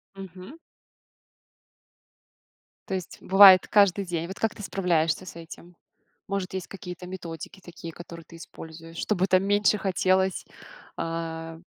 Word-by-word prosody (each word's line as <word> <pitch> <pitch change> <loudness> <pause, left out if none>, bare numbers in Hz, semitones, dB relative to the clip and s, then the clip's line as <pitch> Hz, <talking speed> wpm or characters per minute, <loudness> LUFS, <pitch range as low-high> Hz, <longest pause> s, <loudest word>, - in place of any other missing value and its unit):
Мгм. 190 - -10 2.3
То - - -4
есть 185 -2 -6
бывает 190 -1 +8
каждый 200 -1 +3
день. 170 -1 -3
Вот 190 - -8
как 225 -1 0
ты 210 - -9
справляешься 175 -3 0
с 185 - -10
этим? 170 +1 -12 0.5
Может, 195 -1 -3
есть 185 -2 -4
какие-то 180 -2 -9
методики 175 0 -8
такие, 170 -1 -9
которые 170 -1 -11
ты 170 - -13
используешь, 165 0 -11
чтобы 190 -1 0
там 185 +1 +3
меньше 205 +1 +3
хотелось, 190 0 +1 0.5
а? 165 0 -5
180 Hz, 130 wpm, -26 LUFS, 165-195 Hz, 2.3 s, бывает